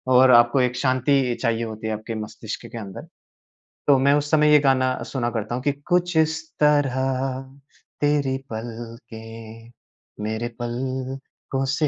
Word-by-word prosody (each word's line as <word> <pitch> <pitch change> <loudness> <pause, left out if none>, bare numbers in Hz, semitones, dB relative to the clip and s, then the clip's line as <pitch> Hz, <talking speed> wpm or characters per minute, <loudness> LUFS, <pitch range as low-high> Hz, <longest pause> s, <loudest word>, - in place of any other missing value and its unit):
और 130 0 +7
आपको 120 +2 +6
एक 125 0 +1
शांति 130 -1 +2
चाहिए 115 -2 0
होती 110 -1 -5
है 110 - -1
आपके 110 +2 -5
मस्तिष्क 110 0 -7
के - - -7
अंदर। 100 -4 -8 0.8
तो 140 - +6
मैं 140 +1 +4
उस 145 +1 0
समय 150 -1 +5
ये 150 - +8
गाना 130 -2 +2 0.2
सुना 120 -3 0
करता 110 +1 -3
हूँ 125 - -4
कि 145 - +2 0.2
कुछ 175 -1 +1
इस 160 0 +2 0.2
तरह 145 -3 +3 1.0
तेरी 145 -2 +2
पलकें 115 0 -9 0.5
मेरे 110 +2 -2
पलकों 130 +2 -4
से 155 -2 +2
130 Hz, 145 wpm, -23 LUFS, 115-140 Hz, 1.0 s, ये